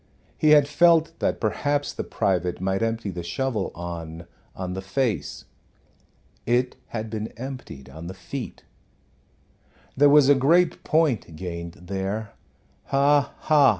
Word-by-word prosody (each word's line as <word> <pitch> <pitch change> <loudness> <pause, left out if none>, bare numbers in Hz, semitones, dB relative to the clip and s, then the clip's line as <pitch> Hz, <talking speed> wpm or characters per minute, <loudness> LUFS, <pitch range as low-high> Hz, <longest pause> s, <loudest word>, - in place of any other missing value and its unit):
He 155 - +2
had 150 -2 +7
felt 165 +2 +4
that - - 0
perhaps 145 +6 -1
the - - -4
private 90 -2 -1
might 95 +2 -1
empty 115 -2 -1
the 90 -1 -5
shovel 105 +4 -2
on 85 -1 -6 0.3
on 90 -1 -4
the 95 - -4
face. 110 +2 -2 1.0
It 125 +2 +1
had 110 -1 -5
been 110 -1 -3
emptied 125 - -8
on 80 +2 -9
the 95 - -7
feet. 120 +8 -7 1.3
There 145 +2 +6
was 145 -1 +6
a 145 - +8
great 160 +6 +3
point 145 - +1
gained 85 0 -6
there 95 +4 -4 0.5
ha, 140 0 +2
ha! 150 -3 +5
115 Hz, 135 wpm, -24 LUFS, 90-140 Hz, 1.3 s, a